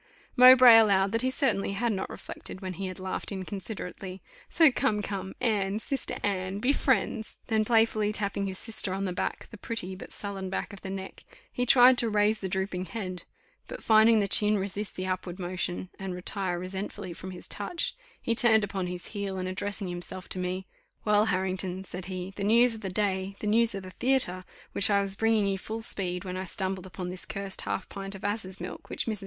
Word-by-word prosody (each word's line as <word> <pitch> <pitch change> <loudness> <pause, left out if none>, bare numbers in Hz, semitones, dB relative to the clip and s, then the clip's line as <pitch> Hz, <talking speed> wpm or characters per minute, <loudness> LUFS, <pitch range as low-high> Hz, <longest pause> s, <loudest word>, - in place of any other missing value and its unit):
Mowbray 250 -2 +10
allowed 195 -3 +4
that 230 +1 +2
he 255 - +1
certainly 260 -7 +1
had 225 +3 0
not 190 -1 -3
reflected - - -8
when 185 -1 -5
he 190 +2 -4
had 185 0 -7
laughed 185 +2 -4
inconsiderately. 190 -1 -6 0.3
"So 320 -4 +6
come, 220 -5 +1
come. 195 -2 -4
Anne, 205 -4 +1
sister 270 +5 -3
Anne, 190 -1 -1
be 250 +7 +2
friends!" 245 -5 0
then 220 -1 +2
playfully 220 -2 +3
tapping 200 -1 -1
his 190 -1 -4
sister 215 -4 +1
on 195 +1 -2
the 185 - -2
back, - - -3
the 225 - -11
pretty, 225 -5 -4
but 185 - -10
sullen 195 -2 -5
back 195 +2 -3
of 200 - -10
the 190 - -6
neck, 190 0 -7 0.3
he 250 0 -1
tried 250 0 +7
to 230 - +1
raise 210 +1 +2
the 190 - -3
drooping 190 0 -2
head; 185 -5 -5 0.4
but - - -8
finding 220 +1 +6
the 200 - +1
chin 210 +2 +3
resist 200 +1 -2
the 185 - -3
upward 185 -1 -3
motion, 180 0 -3
and 190 -2 -4
retire 180 0 -3
resentfully 190 +1 -5
from 185 - -8
his 180 -1 -8
touch, 270 - -3 0.2
he 230 - 0
turned 220 -2 +4
upon 195 -2 -2
his 180 0 -5
heel, 200 -2 -4
and 185 0 -3
addressing 200 +1 -3
himself 175 +1 -6
to 185 - -3
me, 185 +1 -2 0.4
"Well! 210 0 +4
Harrington," 185 -1 -1
said 180 -1 -7
he, 185 0 -5
"the 200 - -3
news 235 +3 +5
of 220 - -6
the 195 - -3
day, 190 0 -1
the - - -5
news 225 +2 +3
of 195 - -5
the 185 - -9
theatre, 230 -7 +1 0.3
which 200 - +1
I 200 -1 +3
was 195 0 -4
bringing 225 -1 +2
you 195 -1 0
full 220 +3 -5
speed, 180 -3 -1
when 185 0 -4
I 190 - -3
stumbled 190 +1 -3
upon 180 -1 -6
this 180 0 -6
cursed 200 -1 -5
half 195 - -3
pint 195 0 -7
of 195 - -10
asses' 200 -2 -2
milk, 180 +1 -7
which - - -3
Mrs.. 215 -3 -2
195 Hz, 210 wpm, -28 LUFS, 185-220 Hz, 0.4 s, Mowbray